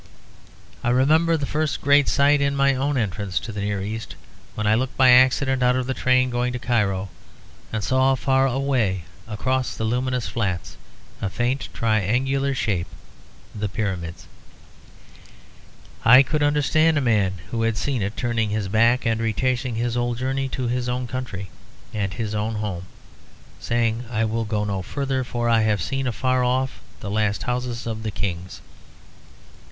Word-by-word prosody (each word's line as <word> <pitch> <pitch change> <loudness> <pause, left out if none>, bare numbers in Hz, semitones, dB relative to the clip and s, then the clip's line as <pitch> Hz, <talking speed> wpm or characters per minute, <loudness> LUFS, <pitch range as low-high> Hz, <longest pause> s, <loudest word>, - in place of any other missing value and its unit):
I 120 - +1
remember 155 +7 +3
the 145 - -2
first 155 +1 -1
great 145 0 +4
sight 145 +1 +4
in 140 0 +1
my 140 0 +3
own 135 +2 0
entrance 100 -4 -2
to 115 - -6
the 105 -1 -5
Near 100 -1 -2
East, 110 +3 -5 0.4
when 105 - -2
I 105 - +4
looked 130 +3 -1
by 130 -1 +7
accident 130 +1 +4
out 125 0 +4
of 130 -1 -1
the 130 - -1
train 130 0 +2
going 125 +1 -1
to - - -2
Cairo, 100 -6 0 0.6
and 110 -2 -2
saw 130 +3 +3
far 135 +2 +2
away 125 -9 0 0.2
across 130 +4 -1
the - - -3
luminous 125 +2 -1
flats 95 -7 -3 0.5
a 100 - -1
faint 120 +6 -1
triangular 125 +6 0
shape; 95 -8 -1 0.7
the 105 -1 -3
Pyramids. 95 -5 -4 1.8
I 125 +4 +8
could 150 +3 -1
understand 150 +2 +3
a - - +4
man 105 -7 +2 0.2
who 115 - -1
had 115 -1 0
seen 130 +3 -1
it 100 +2 -3
turning 115 -3 0
his 105 -2 -2
back 115 +4 +3
and 115 -1 +1
retracing 125 +2 -1
his 120 +1 -1
whole 120 0 0
journey 135 +2 -2
to 130 -1 -3
his 125 +1 -1
own 125 +1 -2
country 120 -7 -5 0.4
and 100 -3 -2
his 105 +3 -4
own 105 +1 -1
home, 100 -4 -4 0.7
saying, 115 0 0
"I 115 -1 0
will 115 +1 -1
go 105 -1 -1
no 100 -2 -2
further; 135 +6 -2
for 120 -1 -2
I 115 -1 +4
have 105 -2 +1
seen 135 -1 -2
afar 130 +2 +1
off 130 +1 0 0.2
the 100 - -5
last 105 -1 0
houses 125 -1 -3
of 110 -1 -4
the 110 - -3
kings." 95 -3 -4
120 Hz, 170 wpm, -23 LUFS, 105-130 Hz, 1.8 s, I